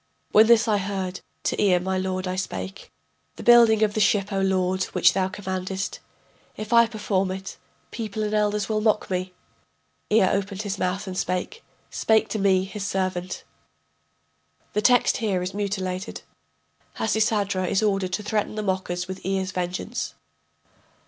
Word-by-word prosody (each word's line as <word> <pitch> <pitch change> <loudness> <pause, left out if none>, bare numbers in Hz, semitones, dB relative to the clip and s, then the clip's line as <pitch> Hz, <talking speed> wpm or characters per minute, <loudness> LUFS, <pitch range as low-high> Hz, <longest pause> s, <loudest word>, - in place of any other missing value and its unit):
] - - -44
When 215 +1 +7
this 235 0 +5
I 210 -2 +2
heard 190 -2 -3 0.2
to - - 0
Ea 190 -3 +4
my 190 +2 -2
lord 185 0 -2
I 185 - -2
spake: 95 - -5 0.4
The - - -9
building 235 -2 +6
of 210 -1 +2
the 215 - -1
ship, 205 0 +2
O 195 - 0
lord, 185 -1 +1
which 180 -1 +3
thou 185 -1 +1
commandest 190 0 -4 0.6
If 215 +2 -4
I 235 0 +7
perform 205 -4 -1
it, 190 +1 -6 0.3
people 215 -2 -4
and 210 0 -2
elders 210 -1 +1
will 215 -1 0
mock 215 -2 +1
me. 185 0 -2 0.8
Ea 215 -1 +5
opened 195 +1 -1
his 200 -1 -4
mouth 190 +3 -1
and 190 -2 -6
spake, 185 - -3 0.3
Spake 220 -1 +2
to 215 - -2
me, 190 -2 +3
his 200 +1 -6
servant: 185 -2 -2 1.3
[The 210 - +1
text 245 +2 +4
is - - -7
here 195 -6 0
mutilated: 195 -1 -3 0.7
Hasisadra 210 -4 +1
is 195 +4 +1
ordered 195 -3 0
to 210 - -2
threaten 210 0 -1
the 215 - -3
mockers 185 -2 -2
with 190 0 -7
Ea's 190 0 -1
vengeance. 180 0 -3
195 Hz, 160 wpm, -24 LUFS, 185-215 Hz, 1.3 s, When